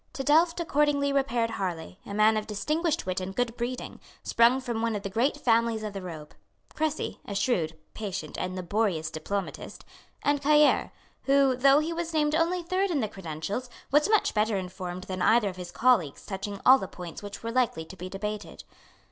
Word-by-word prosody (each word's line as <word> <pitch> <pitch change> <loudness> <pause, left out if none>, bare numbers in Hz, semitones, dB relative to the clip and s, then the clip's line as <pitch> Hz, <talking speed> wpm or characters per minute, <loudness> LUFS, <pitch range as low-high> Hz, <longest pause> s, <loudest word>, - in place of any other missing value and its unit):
To 270 - -4
Delft 330 +4 +4
accordingly 290 -3 +1
repaired 240 -4 +1
Harlay, 180 -4 -4
a 200 - -6
man 215 +1 +5
of 215 0 -2
distinguished 305 +10 -1
wit 185 0 -2
and 190 +1 -5
good 245 -2 -1
breeding, 245 +1 -4 0.2
sprung 235 +3 +4
from 235 -3 -3
one 230 -1 0
of 200 - -4
the 195 - -4
great 250 +8 +1
families 230 -4 +2
of 210 -1 -4
the 195 - -5
robe; 160 -4 -8 0.4
Crecy, 310 -1 -2
a 200 - -6
shrewd, 175 -7 0 0.2
patient 200 -3 -5
and 185 0 -3
laborious 185 -3 -1
diplomatist; 195 +5 -5 0.4
and 290 0 +2
Cailleres, 300 +1 +4 0.4
who, 275 -1 +4
though 275 +2 +5
he 310 +3 0
was 335 -1 -4
named 300 -1 +2
only 340 +3 +1
third 370 +3 0
in 320 -5 0
the 220 - 0
credentials, 195 +5 -5 0.2
was 295 +7 +4
much 430 -1 +3
better 215 -1 +1
informed 185 -1 -5
than 185 -1 -5
either 220 +2 +4
of 185 - -9
his 180 -1 -7
colleagues 215 - +2
touching 200 0 -5
all 265 +1 +8
the 190 - -4
points 175 -3 -9
which 205 +1 -8
were 230 - -3
likely 230 -10 0
to 190 - -11
be 185 0 -7
debated. 210 +2 -5
225 Hz, 190 wpm, -27 LUFS, 190-280 Hz, 0.4 s, all